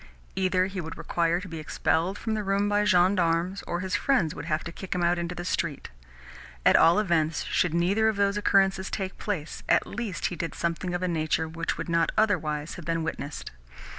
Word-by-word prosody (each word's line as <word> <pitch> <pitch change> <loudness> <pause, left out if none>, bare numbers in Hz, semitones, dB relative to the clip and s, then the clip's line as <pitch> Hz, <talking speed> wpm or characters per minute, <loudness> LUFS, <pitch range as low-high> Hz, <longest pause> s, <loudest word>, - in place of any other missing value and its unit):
Either 185 -1 +2
he 190 -1 -4
would 160 0 -7
require 170 0 0
to 185 - -8
be 165 -2 -6
expelled 165 +4 0
from 225 - -3
the 215 -1 -1
room 200 +1 +1
by 205 0 +2
gendarmes, 180 -1 +2
or 175 +1 -2
his 190 +1 -2
friends 245 - +2
would 150 - -7
have 155 -1 -1
to 170 - -6
kick 185 +2 -6
him 180 - 0
out 175 0 +2
into 170 +1 -3
the 175 - -6
street. 155 - -2 0.7
At - - +6
all 165 +1 +6
events, 165 -6 +1
should 170 -2 0
neither 195 +6 +2
of 220 - +1
those 200 0 +2
occurrences 195 -2 +2
take 190 -2 -4
place, 175 -7 -4
at - - +4
least 215 -5 -4
he - - -4
did 165 -3 -4
something 170 +1 -2
of 175 - -2
a - - +1
nature 160 -1 0
which 165 +1 -3
would - - -4
not 170 -1 +2
otherwise 155 -8 +1
have 175 - -9
been 165 -1 -1
witnessed. 150 -2 -5
175 Hz, 210 wpm, -27 LUFS, 165-195 Hz, 0.7 s, At